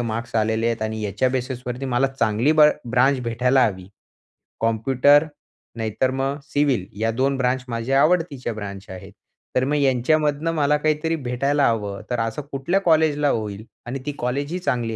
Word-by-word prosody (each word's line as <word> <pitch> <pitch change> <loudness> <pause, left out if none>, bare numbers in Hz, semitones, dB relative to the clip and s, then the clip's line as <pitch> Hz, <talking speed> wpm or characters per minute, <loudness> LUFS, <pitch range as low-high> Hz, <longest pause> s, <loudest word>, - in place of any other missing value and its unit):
Marks 115 0 -4
आलेले 110 +1 +1
आहेत 115 -1 -1
आणि 110 0 -3
याच्या 105 +5 0
बेसिसवरती 125 0 -4
मला 130 +1 +2
चांगली 120 +1 +1
ब्र 150 -1 +6 0.2
ब्रांच 130 +2 +3
भेटायला 125 +3 +2
हवी. 95 -3 -5 0.7
कॉम्प्युटर 130 +6 +3 0.5
नाहीतर 115 +3 -1
मग 135 +2 -2
सिव्हिल 140 -8 0 0.2
या 115 0 +1
2 135 +4 0
ब्रांच 125 0 0
माझ्या 120 +4 +1
आवडतीच्या 155 -7 +1
ब्रांच 100 -2 -7
आहेत. 95 -1 -10 0.4
तर 125 - +3
मग 145 +2 0
यांच्यामधनं 145 +4 +1
मला 150 -2 +2
काहीतरी 155 +2 0
भेटायला 140 +1 0
हवं 105 -3 -3
तर 125 -1 -1
असं 115 +5 -2
कुठल्या 140 +8 0
कॉलेजला 155 -4 +3
होईल. 105 -3 -3 0.2
आणि 130 +3 -4
ती 145 - -2
कॉलेज 140 +4 -2
ही 180 - -2
चांगली 120 -9 -1
130 Hz, 160 wpm, -22 LUFS, 115-145 Hz, 0.7 s, ब्र